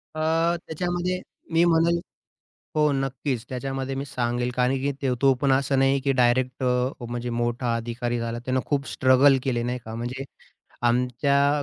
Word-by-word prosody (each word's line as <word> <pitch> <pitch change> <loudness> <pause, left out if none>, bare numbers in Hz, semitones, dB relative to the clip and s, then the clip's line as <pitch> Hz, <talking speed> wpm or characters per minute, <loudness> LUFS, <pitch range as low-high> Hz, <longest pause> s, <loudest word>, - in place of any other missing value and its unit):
अ, - - -4 0.5
त्याच्यामध्ये, 175 +2 -2 0.3
मी 165 +1 +4
म्हणेल. 170 0 +3 0.8
हो, 150 -1 +4
नक्कीच. 135 -2 -2
त्याच्यामध्ये 135 +1 -3
मी 135 +1 -3
सांगेल, 120 -2 -1
कारण 125 +1 +2
की 140 +2 0
ते 135 - +1
तो 135 -1 +6
पण 140 -2 +3
असं 135 0 +2
नाही 135 +1 +3
की 135 +1 +1
डायरेक्ट 125 0 +1
अ, 125 0 0
म्हणजे 120 +1 -4
मोठा 120 0 -1
अधिकारी 120 +1 -3
झाला. 115 0 -3
त्यानं 130 0 0
खूप 140 -2 -1
स्ट्रगल 130 +1 +5
केले 120 -3 0
नाही 125 +1 -2
का. 110 - -7
म्हणजे 120 +3 -4 0.6
आमच्या 140 +4 +2
130 Hz, 160 wpm, -25 LUFS, 120-140 Hz, 0.8 s, तो